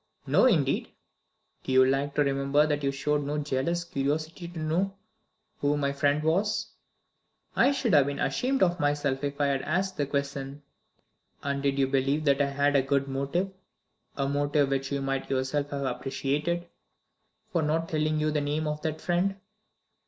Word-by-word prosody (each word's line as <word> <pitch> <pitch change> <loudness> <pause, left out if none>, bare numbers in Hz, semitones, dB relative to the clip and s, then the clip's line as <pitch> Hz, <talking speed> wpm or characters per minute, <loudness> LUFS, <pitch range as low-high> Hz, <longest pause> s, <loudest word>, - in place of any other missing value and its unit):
"No, - - +4
indeed!" 150 - +2 0.7
"Do - - -4
you 130 0 +6
like 140 +2 0
to 150 - +4
remember 140 +1 +2
that 150 -1 0
you 140 - +1
showed 145 +2 0
no 145 +1 -2
jealous 150 +4 -1
curiosity 155 +3 -2
to 170 0 -10
know 170 +5 0 0.6
who 145 +1 +1
my 140 -1 0
friend 145 +1 +1
was?" 185 +7 0 0.8
"I 275 - +5
should 265 -7 0
have 145 -2 +6
been 140 0 -3
ashamed 265 - +1
of 175 -1 +2
myself 145 -2 0
if 140 0 -3
I 145 - +3
had 140 -1 +1
asked 190 +6 -1
the 145 - 0
question." 140 0 -3 0.8
"And 140 0 -1
did 140 0 0
you 135 - +3
believe 135 +3 0
that 140 0 +3
I 140 - +3
had 140 +1 +1
a 140 - +5
good 140 +1 0
motive 140 +8 -1 0.6
a 140 -1 0
motive 145 0 +1
which 135 0 -1
you 140 -1 -1
might 135 0 -2
yourself 135 +2 -1
have 140 -1 -3
appreciated 140 +6 -2 0.9
for 170 - +1
not 160 +2 0
telling 155 -1 0
you 155 0 +1
the 150 -1 0
name 150 +2 -1
of 150 0 -3
that 155 0 -3
friend?" 180 +3 +1
145 Hz, 175 wpm, -28 LUFS, 140-155 Hz, 0.9 s, you